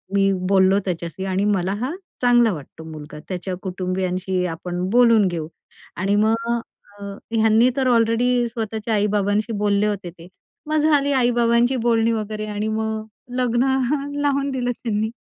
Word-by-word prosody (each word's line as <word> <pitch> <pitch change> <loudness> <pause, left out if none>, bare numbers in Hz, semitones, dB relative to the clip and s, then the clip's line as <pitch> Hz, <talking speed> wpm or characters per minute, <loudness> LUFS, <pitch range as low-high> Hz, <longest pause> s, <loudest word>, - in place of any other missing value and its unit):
मी 195 0 +3 0.2
बोललो 190 0 +4
त्याच्याशी 170 0 -4
आणि 195 +1 0
मला 195 -2 +1
हा 290 - -3 0.3
चांगला 240 -2 +4
वाटतो 160 +1 -10
मुलगा. 150 -1 -9
त्याच्या 185 0 -4
कुटुंबियांशी 185 0 -2
आपण 175 +2 -4
बोलून 230 -2 +5
घेऊ." 165 -3 -3 0.5
आणि 195 +3 0
मग 230 +1 0 0.5
अ, - - -9 0.3
ह्यांनी 225 +2 +4
तर 265 -2 +1
ऑलरेडी 240 +1 +2
स्वतःच्या 225 -1 -4
आई-बाबांशी 210 +1 +1
बोलले 205 0 +2
होते 200 -4 -3
ते. 170 0 -14 0.4
मग 310 - 0
झाली 295 -2 +3
आई-बाबांची 240 0 +3
बोलणी 230 -1 +3
वगैरे 215 -1 -3
आणि 210 0 -3
मग 220 0 -2 0.3
लग्न 240 -1 +2 0.6
लावून 280 -1 +1
दिलं 245 -2 -1
त्यांनी. 220 -2 -2
215 Hz, 140 wpm, -22 LUFS, 190-235 Hz, 0.6 s, बोलून